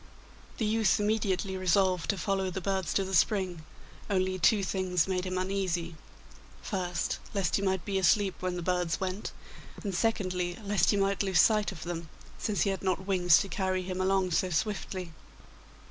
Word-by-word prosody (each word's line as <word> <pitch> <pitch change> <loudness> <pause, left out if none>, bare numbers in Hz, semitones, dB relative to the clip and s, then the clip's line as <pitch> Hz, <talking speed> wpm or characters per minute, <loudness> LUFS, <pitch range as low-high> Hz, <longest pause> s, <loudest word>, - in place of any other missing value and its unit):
The 225 - 0
youth 215 -3 +2
immediately 205 -2 0
resolved 185 -1 +2
to 200 - +1
follow 190 +1 -1
the 185 - -4
birds 190 -2 -1
to 195 - +3
the 190 0 -5
spring, 185 -2 +1 0.5
only 185 -1 0
two 205 +3 +4
things 185 -2 0
made 185 -1 -1
him 185 0 -2
uneasy: 185 -3 -2 0.6
first, 180 -4 -2 0.2
lest 185 -5 +1
he - - -2
might 190 -4 0
be 195 -1 0
asleep 195 +1 +3
when 185 -1 -2
the 175 - -4
birds 180 -2 0
went, 190 +2 -3 0.5
and 200 -2 -3
secondly, 180 -4 -1
lest 200 -4 +2
he 205 - +3
might 195 0 +1
lose 190 -4 +2
sight 210 +1 +4
of 160 -5 -9
them, 170 -2 -5 0.3
since 210 -2 -1
he 200 - +2
had 195 - -4
not 190 0 -1
wings 180 -4 +5
to 200 - -3
carry 185 -1 -1
him 185 0 -3
along 190 -1 +1
so 185 +3 +1
swiftly. 185 -1 -2
190 Hz, 175 wpm, -29 LUFS, 180-195 Hz, 0.6 s, wings